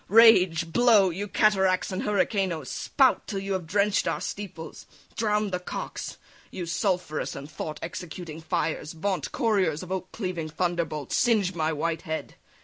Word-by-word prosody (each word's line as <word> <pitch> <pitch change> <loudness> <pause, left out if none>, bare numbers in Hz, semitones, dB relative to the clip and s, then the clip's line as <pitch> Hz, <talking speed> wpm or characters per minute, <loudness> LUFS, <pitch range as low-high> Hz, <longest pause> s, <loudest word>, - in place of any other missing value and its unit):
rage! 185 -7 +6
blow! 220 -5 +5
You 200 +5 -4
cataracts 190 -2 +2
and 185 - -2
hurricanoes 190 - 0
spout 265 -3 +2
Till 200 - -3
you 195 0 -2
have 185 -4 -3
drench'd 200 +3 +2
our - - 0
steeples, 170 -6 -7 0.3
drown'd 210 -2 +1
the 180 - -1
cocks! 180 - -6 0.3
You 180 - -5
sulphurous 175 -2 -1
thought 150 +2 -6
executing 165 -1 -6
fires 160 -2 -2
Vaunt 185 +3 -2
couriers 190 -9 +1
of 185 - -9
oak 185 -1 -3
cleaving 180 -6 -4
thunderbolts 165 -3 -2
Singe 215 -6 +3
my 160 -2 0
white 160 +1 -1
head! 160 0 -4
180 Hz, 145 wpm, -27 LUFS, 165-200 Hz, 0.3 s, rage